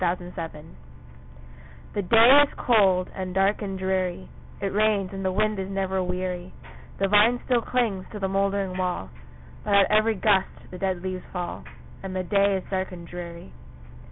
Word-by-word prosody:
THE 180 - +2
RAINY 175 0 -9
DAY 165 -3 -7 1.3
The 205 - -1
day 230 +8 +7
is 290 - +3
cold, 195 -6 +3
and 185 -1 -5
dark, 195 +3 +2
and 195 -2 -4
dreary 185 -1 -2 0.3
It 195 -1 -3
rains, 210 -2 +1
and 195 0 -5
the 190 - 0
wind 215 +1 0
is 190 0 -4
never 190 -1 -1
weary; 180 0 -4 0.5
The 195 - +2
vine 210 +5 +4
still 245 -2 +2
clings 225 -7 -1
to 215 - -6
the 195 -2 -1
mouldering 195 -1 -1
wall, 180 - -2 0.5
But 205 - +1
at 200 +1 +4
every 215 +1 +3
gust 195 -1 +2 0.2
the 180 - -8
dead 185 -2 -2
leaves 185 -1 -4
fall, 175 - -5 0.4
And 190 -1 -6
the 185 - -1
day 200 +2 +2
is 185 - -6
dark 190 0 -2
and 170 -2 -9
dreary. 170 - -8
190 Hz, 180 wpm, -25 LUFS, 185-205 Hz, 1.3 s, day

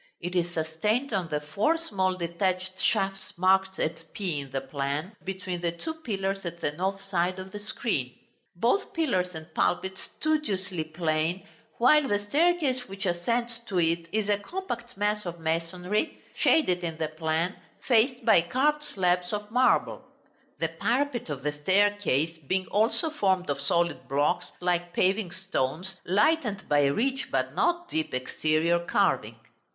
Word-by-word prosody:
It 180 +1 -4
is 175 -1 +2
sustained 210 - -1
on 185 -4 0
the 150 -2 -1
four 200 - +1
small 190 - 0
detached 185 +2 -1
shafts 195 -3 0
marked 190 +1 +3
at 165 0 -3
p 180 -8 -2
in 140 -1 -7
the 135 +1 -2
plan, 140 +7 -3
between 185 -2 -4
the 170 -1 0
two 245 - -5
pillars 195 -10 -3
at 170 -1 -5
the 145 - 0
north 190 +5 -2
side 185 -2 0
of 190 0 -7
the 205 - -6
screen; 205 - -2 0.4
both 235 - +1
pillars 185 - 0
and 160 0 -9
pulpit 190 +2 0
studiously 195 - -1
plain, 160 +2 -1 0.3
while 285 +4 +5
the 205 - +2
staircase 275 +3 +1
which 195 0 -5
ascends 230 +7 0
to 185 -4 0
it 165 0 +1
is 215 0 0
a 205 -1 +2
compact 240 - -5
mass 210 +1 0
of 170 0 -5
masonry 175 - -1 0.2
(shaded 185 - +3
in 165 -2 -3
the 160 -1 -1
plan), 160 +3 -1 0.3
faced 245 0 +3
by 220 -7 +7
carved 275 - +1
slabs 180 -10 0
of 210 0 -4
marble; 255 +2 +3 0.5
the - - 0
parapet 250 - 0
of 140 -3 -4
the 150 - +1
staircase 170 -1 +2
being 185 +3 +1
also 225 +9 +2
formed 190 - +1
of 140 -1 -3
solid 170 -3 0
blocks 145 +2 +1
like 175 -1 0
paving 190 +1 +2
stones, 185 -1 -2
lightened 210 - +2
by 145 -1 +4
rich, 255 - 0
but 130 0 0
not 345 - +1
deep, 160 -4 -2
exterior 155 +6 +1
carving. 170 - +1
185 Hz, 155 wpm, -28 LUFS, 165-215 Hz, 0.5 s, by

